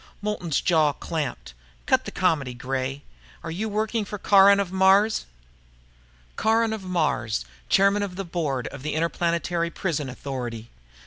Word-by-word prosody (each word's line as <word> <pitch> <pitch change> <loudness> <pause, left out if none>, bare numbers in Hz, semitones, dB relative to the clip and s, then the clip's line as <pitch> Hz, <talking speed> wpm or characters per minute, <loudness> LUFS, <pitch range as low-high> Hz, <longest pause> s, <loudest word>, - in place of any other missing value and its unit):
Moulton's 205 -7 -1
jaw 155 -4 +3
clamped. 150 - -4 0.3
"Cut - - +2
the - - -5
comedy, 135 -6 0
Gray. 135 +2 -3 0.4
Are - - -5
you 210 +7 -3
working 215 +1 -1
for 210 +1 -6
Caron 200 0 +6
of 195 -3 -1
Mars?" 190 - +3 1.1
Caron 225 +1 +2
of 220 - -5
Mars, 145 - -1 0.2
chairman 200 +1 +4
of 195 -3 -3
the 195 +1 -4
board 150 -8 -2
of 140 - -10
the 150 +2 -3
Interplanetary 170 +1 0
Prison 155 -6 -3
Authority. 125 -4 -6
170 Hz, 140 wpm, -25 LUFS, 140-200 Hz, 1.1 s, Caron